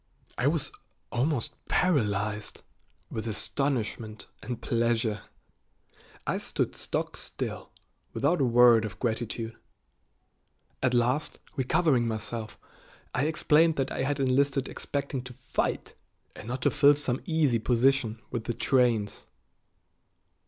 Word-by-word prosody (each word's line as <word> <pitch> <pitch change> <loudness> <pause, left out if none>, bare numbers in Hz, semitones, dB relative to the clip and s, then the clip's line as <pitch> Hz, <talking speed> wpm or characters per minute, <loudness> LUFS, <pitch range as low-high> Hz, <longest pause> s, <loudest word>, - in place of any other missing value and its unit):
I - - +1
was - - 0 0.4
almost 130 0 0
paralyzed 105 - 0 0.5
with 110 +1 -4
astonishment 115 -2 -2 0.2
and 125 -2 -5
pleasure. 115 -3 0 1.0
I - - 0
stood - - -2
stock - - -2
still, - - -5 0.4
without 145 +3 +1
a - - +4
word 120 -1 +6
of 100 -3 -5
gratitude. 115 -1 -2 1.3
At 125 -1 +2
last, 125 +5 +1 0.2
recovering 130 -2 +2
myself, 110 0 -4 0.6
I 130 - +1
explained 160 +1 +4
that 135 -2 -1
I - - -2
had 140 +1 0
enlisted 135 +1 +2
expecting 140 -2 -3
to 130 0 -10
fight, 125 +1 -2 0.4
and 105 - -10
not 125 +1 -3
to - - +4
fill 145 0 +6
some 135 -3 -1
easy 155 -8 +2
position 120 -1 +2
with 115 -3 -3
the 120 - -2
trains. 120 -5 +1
125 Hz, 115 wpm, -28 LUFS, 115-140 Hz, 1.3 s, word